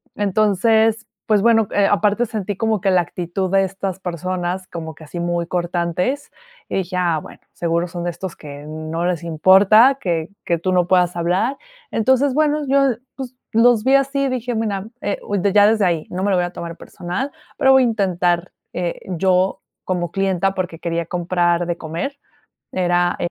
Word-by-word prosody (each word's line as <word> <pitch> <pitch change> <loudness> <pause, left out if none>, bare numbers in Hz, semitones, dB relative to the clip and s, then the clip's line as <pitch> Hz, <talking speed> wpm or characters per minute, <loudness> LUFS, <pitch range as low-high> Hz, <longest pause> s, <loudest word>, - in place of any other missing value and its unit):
Entonces, 215 +3 +2 0.2
pues 210 -3 +3
bueno, 225 -1 +4
eh, 200 -1 +3
aparte 205 +3 +2
sentí 205 -3 -4
como 220 -3 0
que 195 - +2
la 185 - +4
actitud 175 +2 -3
de 195 0 +4
estas 190 -1 -4
personas, 180 +1 -3
como 160 -2 -7
que 155 - -13
así 170 +3 -7
muy 175 0 -1
cortantes, 175 - -1 0.4
y - - -2
dije: 185 -1 -2
"Ah, 170 -3 +1
bueno, - - -13
seguro 170 +1 -1
son 175 0 -6
de 175 - -1
estos 175 +1 -6
que 145 -1 -10
no 155 +2 -4
les 175 -2 -1
importa 195 - +5
que 165 -3 -1
que 170 - 0
tú 185 +3 -1
no 180 -1 +2
puedas 180 -1 +3
hablar". 180 +10 0 0.4
Entonces, 260 +4 +2
bueno, 300 +1 +2
yo, 275 -2 +3 0.2
pues, 260 -2 -7 0.2
los 230 -1 +4
vi 265 +1 +5
así 275 0 +1
dije: 250 -2 -2
"Mira, 210 -3 -2
eh, 205 - -2 0.3
ya 205 0 +6
desde 215 -2 +3
ahí 170 -3 0
no 185 +1 -3
me 200 - +1
lo - - +3
voy 175 - +1
a - - -4
tomar 170 -2 -7
personal, 180 +11 -5 0.3
pero 265 - +4
voy 265 -1 +6
a - - +3
intentar", 180 -5 0 0.2
eh, 175 -1 -3
yo 185 +1 +1 0.2
como 175 -2 -2
clienta 195 0 0
porque 180 -4 -4
quería 170 -1 -2
comprar 175 0 0
de 175 0 -2
comer, 170 - -5 0.6
era 175 -1 +1
185 Hz, 180 wpm, -20 LUFS, 175-220 Hz, 0.6 s, ya